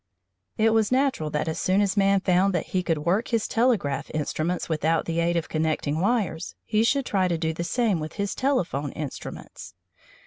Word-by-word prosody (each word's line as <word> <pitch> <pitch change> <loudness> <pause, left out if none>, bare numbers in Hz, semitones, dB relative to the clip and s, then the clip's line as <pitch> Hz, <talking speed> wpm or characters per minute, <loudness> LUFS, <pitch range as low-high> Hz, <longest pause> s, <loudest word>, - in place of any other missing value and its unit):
It 225 +1 +4
was 220 -1 +2
natural 260 - +1
that 150 +1 -2
as 160 - -2
soon 190 +2 +2
as 200 -1 +1
man 195 -1 +3
found 185 +1 +2
that 170 - -1
he 185 - +2
could 160 -4 -2
work 190 +7 +1
his 230 -2 0
telegraph 180 - +1
instruments 155 +3 -2
without 160 0 0
the 165 0 -1
aid 170 +1 +1
of 165 - -2
connecting 155 -1 -1
wires, 200 -5 -1
he 215 +1 +2
should 270 +3 +2
try 190 -4 +1
to 170 -2 0
do 160 0 -1
the 170 - -4
same 215 -1 +1
with 155 0 -5
his 200 -1 -2
telephone 175 - -1
instruments. 150 -3 -8
180 Hz, 195 wpm, -25 LUFS, 160-215 Hz, -, It